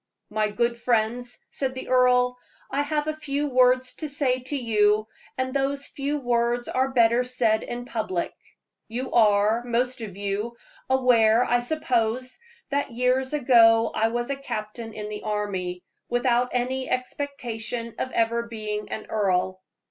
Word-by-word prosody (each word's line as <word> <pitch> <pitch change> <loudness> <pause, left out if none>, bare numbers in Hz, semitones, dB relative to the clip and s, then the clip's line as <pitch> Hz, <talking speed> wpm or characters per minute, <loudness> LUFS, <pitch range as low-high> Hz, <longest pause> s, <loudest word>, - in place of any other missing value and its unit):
"My 215 0 +1
good 235 +3 0
friends," 235 0 0
said 260 -1 -2
the 260 - -7
earl, 250 -1 +3 0.3
"I 280 - +1
have 295 +1 -1
a 310 0 -2
few 295 -1 -2
words 255 0 +4
to 310 - -3
say 270 -3 +1
to 260 +3 -4
you, 215 -4 +2 0.3
and 260 0 -1
those 280 0 0
few 285 +1 -3
words 240 -1 0
are 260 +1 +1
better 235 -1 +4
said 240 -3 +1
in 245 0 -6
public. 215 -8 -2 0.5
You 250 +3 -4
are, 215 0 +4
most 245 +1 -1
of 200 -4 -7
you, 205 +4 -3 0.3
aware, 245 -3 +4
I 245 - +2
suppose, 250 -2 -1 0.3
that 285 +1 0
years 255 +3 +1
ago 230 -5 +5
I 220 - +2
was 240 +3 -2
a - - 0
captain 225 -4 -6
in 210 -1 -6
the 210 0 -6
army, 195 -4 -3 0.3
without 245 0 +2
any 255 +1 -1
expectation 245 -3 -3
of 260 - -1
ever 235 +1 0
being 215 -2 -4
an 215 - -5
earl. 185 -3 0
240 Hz, 150 wpm, -25 LUFS, 220-255 Hz, 0.5 s, ago